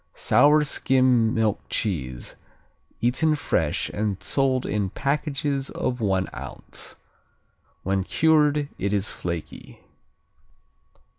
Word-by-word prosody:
Sour 150 +1 +4
skim 130 -5 +3
milk 110 -3 +1
cheese, 65 - -2 0.7
eaten 130 +7 +2
fresh 80 - 0
and 105 -2 -2
sold 130 +2 +1
in 100 -2 -1
packages 140 - -1
of 125 -1 -3
one 95 -3 +1
ounce. - - -8 0.9
When 95 0 0
cured 150 +2 +3
it 100 +1 -1
is 100 0 0
flaky. 85 -2 -6
125 Hz, 95 wpm, -24 LUFS, 100-145 Hz, 0.9 s, Sour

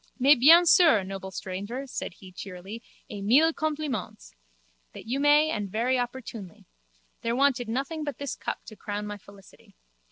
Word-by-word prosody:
Mais 275 +3 +6
bien 320 +7 +7
sûr, 320 - +5
noble 190 0 -7
stranger, 200 +8 -6
said 255 -8 -6
he 190 -1 -14
cheerily, 190 +4 -9 0.3
et 205 -1 -8
mille 280 +11 +4
compliments. 285 - -4 0.6
That - - -11
you 260 +4 -1
may 295 +2 +4
and 205 -6 -3
very 245 +6 0
opportunely. 235 -7 -7 0.6
There 230 +1 -1
wanted 260 -3 +1
nothing 275 +6 -3
but 290 -2 -5
this 280 -2 -5
cup - - -6
to 215 - -11
crown 205 0 -5
my 205 0 -7
felicity. 200 0 -18
235 Hz, 160 wpm, -27 LUFS, 200-280 Hz, 0.6 s, bien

